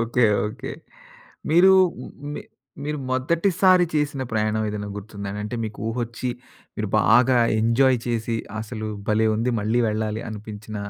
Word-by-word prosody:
Okay. 120 Hz, +1 st, +2 dB, 0.2 s
Okay. 130 Hz, +5 st, -6 dB, 0.8 s
మీరు 175 Hz, +4 st, +6 dB, 0.6 s
మీ -, -, -5 dB, 0.4 s
మీరు 150 Hz, 0 st, -2 dB
మొదటిసారి 175 Hz, +7 st, +3 dB
చేసిన 150 Hz, -3 st, 0 dB
ప్రయాణం 110 Hz, 0 st, 0 dB
ఏదైనా 105 Hz, -1 st, -4 dB
గుర్తుందా? 100 Hz, -1 st, -7 dB
అంటే 105 Hz, +3 st, -4 dB
మీకు 110 Hz, -1 st, -7 dB
ఊహోచ్చి, 120 Hz, +1 st, -3 dB, 0.5 s
మీరు -, -, -2 dB
బాగా 125 Hz, +3 st, +5 dB, 0.2 s
ఎంజాయ్ 125 Hz, +3 st, +3 dB
చేసి, 115 Hz, -1 st, -1 dB, 0.2 s
అసలు 110 Hz, -1 st, -5 dB, 0.2 s
భలే! 110 Hz, +1 st, +3 dB
ఉంది. 120 Hz, +3 st, 0 dB
మళ్ళీ 110 Hz, +4 st, +1 dB
వెళ్ళాలి 110 Hz, +1 st, -2 dB
అనిపించిన 105 Hz, 0 st, -8 dB
115 Hz, 125 wpm, -23 LUFS, 110-130 Hz, 0.8 s, మీరు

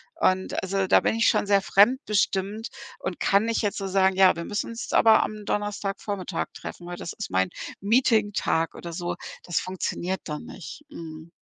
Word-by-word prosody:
Und 185 Hz, 0 st, +1 dB
also 190 Hz, 0 st, 0 dB
da -, -, +5 dB
bin -, -, +1 dB
ich 230 Hz, -, +4 dB
schon -, -, +2 dB
sehr 200 Hz, -1 st, +4 dB
fremdbestimmt 205 Hz, -1 st, +2 dB, 0.3 s
und 185 Hz, -2 st, -4 dB
kann 200 Hz, +2 st, +3 dB
nicht 230 Hz, 0 st, 0 dB
jetzt 205 Hz, 0 st, -1 dB
so 195 Hz, -1 st, -3 dB
sagen: 190 Hz, 0 st, +3 dB
„Ja, 190 Hz, -1 st, +7 dB
wir 170 Hz, 0 st, -5 dB
müssen 205 Hz, -, -3 dB
uns 230 Hz, +2 st, -6 dB
jetzt -, -, -7 dB
aber 225 Hz, -1 st, +6 dB
am 215 Hz, -1 st, -6 dB
Donnerstagvormittag 200 Hz, -3 st, -3 dB
treffen, 175 Hz, -, -8 dB
weil 175 Hz, -, -5 dB
das 170 Hz, -, -6 dB
ist -, -, -6 dB
mein 95 Hz, 0 st, +2 dB, 0.3 s
Meeting-Tag“, 210 Hz, -6 st, +2 dB
oder 170 Hz, -1 st, -7 dB
so. 175 Hz, 0 st, -3 dB, 0.3 s
Das 175 Hz, -, 0 dB
funktioniert 185 Hz, 0 st, -3 dB
dann 150 Hz, -2 st, -5 dB
nicht. 300 Hz, -, -10 dB
Mhm. 160 Hz, -, -9 dB
195 Hz, 185 wpm, -26 LUFS, 175-210 Hz, 0.3 s, Ja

